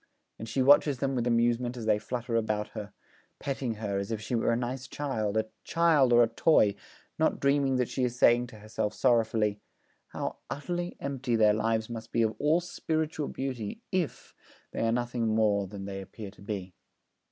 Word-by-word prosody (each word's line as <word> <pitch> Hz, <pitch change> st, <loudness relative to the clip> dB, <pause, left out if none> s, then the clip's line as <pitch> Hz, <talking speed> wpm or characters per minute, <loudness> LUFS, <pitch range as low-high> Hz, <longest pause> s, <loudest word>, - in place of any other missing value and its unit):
And 115 Hz, -, -6 dB
she 130 Hz, -, +1 dB
watches 145 Hz, 0 st, +5 dB
them 135 Hz, +2 st, -1 dB
with 125 Hz, -2 st, 0 dB
amusement 120 Hz, +1 st, +1 dB
as 115 Hz, -, -5 dB
they 105 Hz, -1 st, +3 dB
flutter 120 Hz, +2 st, -3 dB
about 105 Hz, -2 st, 0 dB
her, 105 Hz, -2 st, -7 dB, 0.5 s
petting 130 Hz, -4 st, -3 dB
her 105 Hz, -2 st, -2 dB
as 100 Hz, -, -4 dB
if 110 Hz, -2 st, -2 dB
she 115 Hz, -, -5 dB
were 115 Hz, -, +2 dB
a 115 Hz, -, +2 dB
nice 125 Hz, +1 st, -4 dB
child, 110 Hz, -8 st, -2 dB
a 110 Hz, -, +2 dB, 0.2 s
child 160 Hz, -6 st, +3 dB
or 120 Hz, 0 st, +7 dB
a -, -, +3 dB
toy, 115 Hz, -3 st, +4 dB, 0.5 s
not -, -, +2 dB
dreaming 140 Hz, -1 st, +2 dB
that 125 Hz, -2 st, +1 dB
she 130 Hz, -, -2 dB
is 125 Hz, 0 st, -1 dB
saying 120 Hz, 0 st, +5 dB
to 115 Hz, -, -13 dB
herself 110 Hz, 0 st, -3 dB
sorrowfully: 110 Hz, -4 st, +2 dB, 0.5 s
'How -, -, -4 dB
utterly 175 Hz, +4 st, -4 dB
empty 135 Hz, -3 st, -2 dB
their 105 Hz, -2 st, +5 dB
lives 110 Hz, +1 st, 0 dB
must 115 Hz, -1 st, -7 dB
be 115 Hz, -, +2 dB
of 110 Hz, 0 st, +1 dB
all 155 Hz, +4 st, +3 dB
spiritual 160 Hz, -3 st, -2 dB
beauty 130 Hz, -, -5 dB
if 185 Hz, -5 st, -2 dB, 0.4 s
they -, -, -5 dB
are -, -, +2 dB
nothing 120 Hz, -1 st, -1 dB
more 105 Hz, -2 st, +2 dB
than 100 Hz, 0 st, -7 dB
they 95 Hz, 0 st, -5 dB
appear 100 Hz, +1 st, -9 dB
to 105 Hz, -, -19 dB
be.' 100 Hz, -3 st, -5 dB
120 Hz, 190 wpm, -29 LUFS, 110-135 Hz, 0.5 s, or